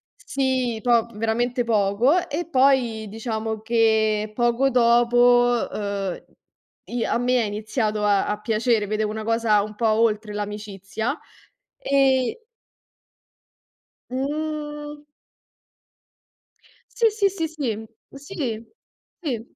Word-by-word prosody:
Sì, 260 -4 -1
po 235 -2 +3
veramente 240 +3 0
poco. 230 - +2
E 315 +4 -3
poi, 255 -6 +2
diciamo, 220 0 -4
che 220 -2 +2
poco 240 +3 +2
dopo, 245 0 +4
uhm, 200 -3 -3 0.6
i 240 -1 -3
a - - 0
me 245 +1 +2
è - - 0
iniziato 215 +1 -2
a 205 -1 +2
a 210 0 -2
piacere. 220 0 +1
Vedevo 215 +1 -1
una 220 0 -5
cosa 225 -2 +2
un 215 - -7
po' 225 +1 0
oltre 215 -1 +1
l'amicizia, 210 - -4 0.6
e 270 - +1 1.6
Mhmm 295 +2 -4 1.9
Sì, 465 - +4
sì, 415 -2 +1
sì. 340 -4 -3
Sì, 240 -9 -4 0.5
sì. 230 -6 -3 0.6
Sì. 245 -8 -5
235 Hz, 105 wpm, -23 LUFS, 215-260 Hz, 1.9 s, dopo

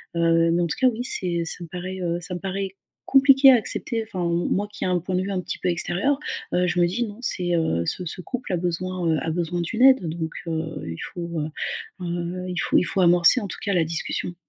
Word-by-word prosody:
heu, 165 0 +3
mais 175 +1 +2
en 170 - +1
tout - - -3
cas, 260 - +5
oui, 245 0 0
c'est 175 -8 -1
ça 170 +1 -3
me - - -13
paraît, 185 +2 -6
heu, 170 0 -1
ça 180 +2 -5
me - - -5
paraît 195 +1 -4 0.3
compliqué 270 0 +7
à - - +7
accepter. 225 0 -1
Enfin, 190 -5 -6
m 170 0 0
moi 205 +2 0
qui - - -4
a - - 0
un 180 -1 +2
point 185 +2 -3
de 185 - +1
vue 200 +1 -3
un 185 -2 -1
petit - - -5
peu - - -2
extérieur, 180 +10 +1 0.4
heu, 180 0 +2
je 175 - 0
me 175 - +5
dis: 225 +7 -1
«Non, 205 +1 -9
c'est, 175 -7 -1
heu, 120 - +1
ce 180 - -1
ce 180 +3 -3
couple 250 -2 -5
a - - +2
besoin, 180 +1 -2
heu, 160 - +2
a 165 - -2
besoin 175 +1 -2
d'une 225 +8 -3
aide, 260 -10 +6
donc 160 0 -3 0.2
heu, 160 -1 -1 0.3
il 85 - -5 0.2
faut 170 -1 -5
heu 150 - -2 0.6
heu, 175 +1 -4
il 180 - -4
faut - - +2
il - - +3
faut 190 - -1
amorcer, 175 +6 +5
en 205 - -5
tout - - -5
cas, 200 -2 0
la 170 -2 +3
discussion. 170 +2 -3
180 Hz, 260 wpm, -24 LUFS, 170-195 Hz, 0.6 s, compliqué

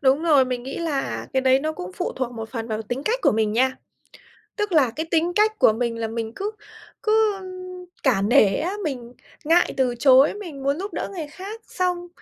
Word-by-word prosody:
Đúng 270 +3 +3
rồi, 295 -6 +5
mình 250 -1 -3
nghĩ 265 - -6
là 310 -5 -2
cái 265 - +2
đấy 260 0 +4
nó 310 +1 -2
cũng 180 -10 -7
phụ - - -3
thuộc 255 -2 -2
một 225 -1 -6
phần 230 -2 -4
vào 220 0 -2
tính 245 +5 -4
cách 475 +3 +1
của - - +4
mình 215 -1 +1
nha. 260 +3 +2 0.8
Tức 420 -2 -2
là 285 -7 +4
cái 315 +8 -4
tính 335 +1 +2
cách 435 +1 +2
của - - +6
mình 230 0 -2
là 225 - -2
mình 225 0 -4
cứ 405 +2 -2 0.5
cứ 435 -2 +2 0.6
cả 235 -8 +2
nể 200 -2 +4
á, 340 +5 -2
mình 250 -5 -5 0.3
ngại 335 +3 +3
từ 255 -2 +1
chối, 265 +4 +6
mình 330 -10 -8
muốn 280 +3 0
giúp 400 +2 -5
đỡ - - -3
người 330 -5 -5
khác. 395 +8 -8
Xong 360 -1 -2
270 Hz, 215 wpm, -23 LUFS, 240-350 Hz, 0.8 s, của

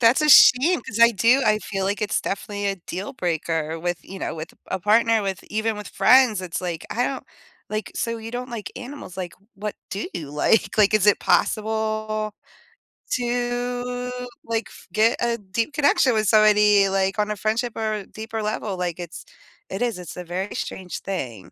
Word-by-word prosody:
That's 235 +4 +5
a 300 - +2
shame 280 +5 +7
'cause 225 - -6
I 235 0 +8
do 235 +6 +3
I 215 0 +3
feel 195 -2 -3
like 200 +2 -1
it's 210 - 0
definitely 205 +1 -3
a 195 -1 -1
deal 185 +7 -6
breaker 165 - -2
with 175 +1 -2
you 195 0 -9
know, - - -3
with 160 0 -7
a - - -26 0.2
a - - -10
partner, 220 +2 +3
with 195 -1 -3
even 220 0 -2
with 210 - -7
friends, 250 -6 +5
it's, 180 -1 -4
like, 175 -3 -4
I 245 +2 0
don't 270 -1 -3 0.5
like, 215 -1 -3
so 230 -1 -2
you 225 0 -7
don't 245 +1 -5
like 230 -3 -6
animals, 255 -7 -8
like, 180 -2 -5 0.2
what 210 +1 -5 0.2
do 200 - -4
you 155 -5 -5
like? 180 +9 +1
Like, 210 0 +5
is 210 -1 +3
it 210 - +5
possible 215 0 0 0.8
to, 245 0 -2 0.3
like, 225 -3 -2
f - - -15
get 225 +2 +3
a 235 -1 +1
deep 225 +7 -3
connection 285 -3 +3
with 215 -1 +1
somebody, 210 -1 +5
like, 195 +1 0
on 210 0 +1
a 210 - -2
friendship 225 +4 -1
or 215 -2 -2
deeper 220 0 -6
level? 210 -2 -3
Like, 175 -1 -2
it's 175 -1 -8 0.4
it 195 +5 -4
is, 235 -6 -1
it's 175 -3 -9
a 180 - -6
very 185 +4 -4
strange 185 -2 -5
thing. 135 - -4
215 Hz, 190 wpm, -23 LUFS, 190-230 Hz, 0.8 s, I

